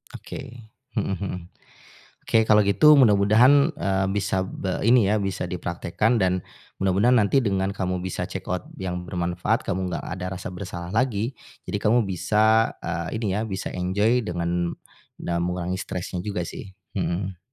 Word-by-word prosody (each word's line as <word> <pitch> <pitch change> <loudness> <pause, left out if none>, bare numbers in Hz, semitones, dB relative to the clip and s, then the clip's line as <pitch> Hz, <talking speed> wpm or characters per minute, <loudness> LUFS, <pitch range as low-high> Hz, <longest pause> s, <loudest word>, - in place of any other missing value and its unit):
Oke, 115 -2 -9 0.2
mhm 95 - 0
mhm. 100 -2 -3 0.9
Oke, 110 -1 +2
kalau 105 -1 +6
gitu 100 +10 +6
mudah-mudahan, 125 +6 +5
eee, 95 -7 0
bisa 95 -2 0
be 95 0 -3
ini 115 -5 +5
ya 110 - +2
bisa 95 -2 -2
dipraktekkan 90 +5 -1
dan 95 -1 +2 0.4
mudah-mudahan 100 +6 +3
nanti 120 +6 +3
dengan 95 -2 0
kamu 90 -2 -1
bisa 95 0 -3
check - - -7
out - - -2 0.2
yang 90 -1 -3
bermanfaat, 90 -1 0
kamu 90 0 -2
nggak - - -3
ada 90 0 -4
rasa - - -6
bersalah 90 -2 -6
lagi. 120 0 0 0.3
Jadi 100 - -1
kamu 115 -1 +3
bisa, 110 +5 +3
eee, 85 +5 -3
ini 100 -4 -1
ya, 110 - 0
bisa 95 -4 -4
enjoy 105 +7 +1
dengan 85 -1 -1 0.5
na 85 - -2
mengurangi 90 0 -2
stresnya 90 0 -4
juga 100 -5 -2
sih, 95 - -8 0.2
mhm. 95 0 -2
95 Hz, 155 wpm, -24 LUFS, 90-110 Hz, 0.9 s, kalau